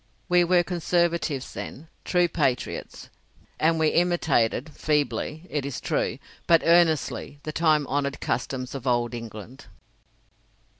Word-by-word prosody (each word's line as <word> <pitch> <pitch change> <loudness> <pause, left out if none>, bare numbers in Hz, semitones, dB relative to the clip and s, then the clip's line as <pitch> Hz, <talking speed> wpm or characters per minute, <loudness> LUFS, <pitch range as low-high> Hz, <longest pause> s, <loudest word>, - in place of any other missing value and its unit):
We 180 0 +4
were 175 0 +3
Conservatives 170 -5 -1
then, 150 +5 -7 0.2
true 175 -1 +3
patriots, 145 -7 -2 0.5
and 165 +1 +3
we 160 -1 +3
imitated 160 -6 +1
feebly, 150 +2 -1
it 145 -5 -2
is 140 -2 -4
true, - - -1 0.3
but 165 -1 +5
earnestly 165 -4 +2
the 155 - -4
time 155 -2 +2
honoured 140 0 -2
customs 130 +1 -3
of 135 -1 -6
old 120 -1 +1
England. 115 +1 -9
155 Hz, 120 wpm, -25 LUFS, 130-170 Hz, 0.5 s, but